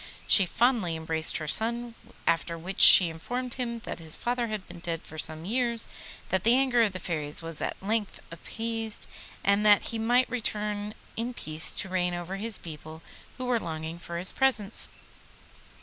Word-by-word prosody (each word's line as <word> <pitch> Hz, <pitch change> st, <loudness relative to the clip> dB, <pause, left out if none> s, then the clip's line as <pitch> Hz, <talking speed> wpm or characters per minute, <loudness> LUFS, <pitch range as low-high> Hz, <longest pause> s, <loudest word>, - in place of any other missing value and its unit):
She 195 Hz, -3 st, +6 dB
fondly 230 Hz, -6 st, 0 dB
embraced 160 Hz, 0 st, -1 dB
her 155 Hz, -, -6 dB
son, 235 Hz, +6 st, +1 dB, 0.3 s
after 170 Hz, 0 st, -1 dB
which 185 Hz, +4 st, -5 dB
she 180 Hz, -, +11 dB
informed 245 Hz, +10 st, -5 dB
him 235 Hz, -2 st, -5 dB
that 240 Hz, -, -7 dB
his 160 Hz, -1 st, +3 dB
father 240 Hz, 0 st, -2 dB
had 215 Hz, -3 st, -6 dB
been 175 Hz, 0 st, -11 dB
dead 170 Hz, -1 st, -5 dB
for 155 Hz, -, -10 dB
some 155 Hz, +1 st, -1 dB
years, 235 Hz, +1 st, +2 dB, 0.4 s
that 190 Hz, -1 st, 0 dB
the 230 Hz, +2 st, +4 dB
anger 260 Hz, -2 st, +2 dB
of 215 Hz, -4 st, +1 dB
the 185 Hz, -, -6 dB
Fairies 155 Hz, -3 st, -3 dB
was 165 Hz, -1 st, -6 dB
at -, -, -3 dB
length 210 Hz, 0 st, -2 dB
appeased, 225 Hz, +5 st, -4 dB, 0.4 s
and 200 Hz, +1 st, +2 dB
that 210 Hz, -1 st, +4 dB
he 230 Hz, -, -4 dB
might 245 Hz, +3 st, +2 dB
return 210 Hz, -3 st, -3 dB, 0.2 s
in 235 Hz, +2 st, -4 dB
peace 155 Hz, -4 st, +3 dB
to 190 Hz, -, -4 dB
reign 180 Hz, -1 st, -1 dB
over 175 Hz, +2 st, -6 dB
his 215 Hz, +1 st, -4 dB
people, 160 Hz, 0 st, -11 dB, 0.3 s
who 255 Hz, -, -5 dB
were 245 Hz, -2 st, 0 dB
longing 160 Hz, -1 st, -6 dB
for 170 Hz, 0 st, -7 dB
his 180 Hz, +2 st, 0 dB
presence. 235 Hz, -6 st, +2 dB
200 Hz, 180 wpm, -27 LUFS, 165-230 Hz, 0.4 s, she